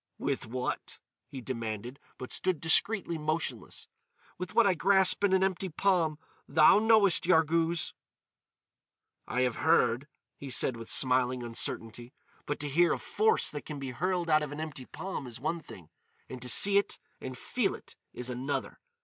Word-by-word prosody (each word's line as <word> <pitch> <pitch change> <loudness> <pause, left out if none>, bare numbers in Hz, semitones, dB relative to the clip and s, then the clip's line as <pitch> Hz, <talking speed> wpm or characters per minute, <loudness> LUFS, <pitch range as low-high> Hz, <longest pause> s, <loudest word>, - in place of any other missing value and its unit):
"With 135 -3 -3
what?" 125 +2 -4 0.3
he 135 - -8
demanded; 115 0 -5 0.2
but 125 - -8
stood 185 -4 -1
discreetly 170 +1 +2
motionless. 155 +2 -3 0.5
"With 180 0 -6
what 235 - +5
I 195 - +4
grasp 190 +2 +3
in 200 - +3
an 190 0 +3
empty 190 0 -1
palm. 165 -3 +1 0.3
Thou 155 +7 +6
knowest, 215 -6 +4
Yarghouz." 165 -1 +2 1.3
"I 125 - -1
have 125 -2 0
heard," 125 +3 +2 0.3
he 140 - -8
said 125 0 0
with 115 -1 -9
smiling 125 -1 +2
uncertainty, 120 +1 -3 0.3
"but 145 - -3
to 145 - -2
hear 170 +5 +3
of - - -6
force 445 +1 +2
that 145 - -7
can 150 - -6
be 135 -2 -5
hurled 175 +6 -2
out 155 0 +5
of 150 -2 -5
an 145 - -7
empty 150 -5 -6
palm 185 -8 -6
is 120 0 -9
one 165 +6 -2
thing, 90 - -14 0.4
and 130 -1 -9
to 125 - -4
see 200 +10 +6
it 200 - -4 0.2
and 130 -1 -7
feel - - -1
it - - -14 0.2
is 125 - -6
another. 130 +2 -4
150 Hz, 165 wpm, -29 LUFS, 125-180 Hz, 1.3 s, Thou